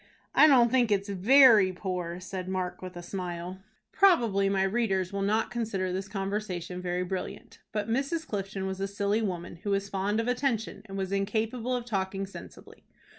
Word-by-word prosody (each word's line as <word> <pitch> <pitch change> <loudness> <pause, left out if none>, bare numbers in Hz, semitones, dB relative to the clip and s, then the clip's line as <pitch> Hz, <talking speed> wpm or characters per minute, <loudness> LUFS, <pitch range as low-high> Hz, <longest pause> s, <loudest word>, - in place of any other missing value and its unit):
"I 310 - +7
don't 245 -5 +5
think 250 -3 +3
it's 200 0 +1
very 215 0 +6
poor," 180 -2 -4
said 185 0 -6
Mark, 185 -1 -3
with 185 -1 -8
a 175 - -7
smile. 180 0 -5 0.3
Probably 230 - +4
my 195 -1 +2
readers 195 -3 0
will 200 - -2
not 215 +3 +1
consider 200 -6 -2
this 190 +1 -3
conversation 195 -3 -4
very 180 0 -1
brilliant; 185 0 -6
but 210 -1 -2
Mrs. 280 +7 -1
Clifton 195 -1 -4
was 190 0 -4
a 195 - -1
silly 200 +2 0
woman, 175 -4 -4
who 205 +4 -5
was 200 0 0
fond 200 +3 -1
of 230 - -1
attention, 245 -5 -1
and 195 -1 -7
was 190 -1 -3
incapable 220 +5 -1
of 245 -1 -3
talking 195 -3 -2
sensibly. 195 - -13
195 Hz, 175 wpm, -28 LUFS, 185-225 Hz, 0.3 s, I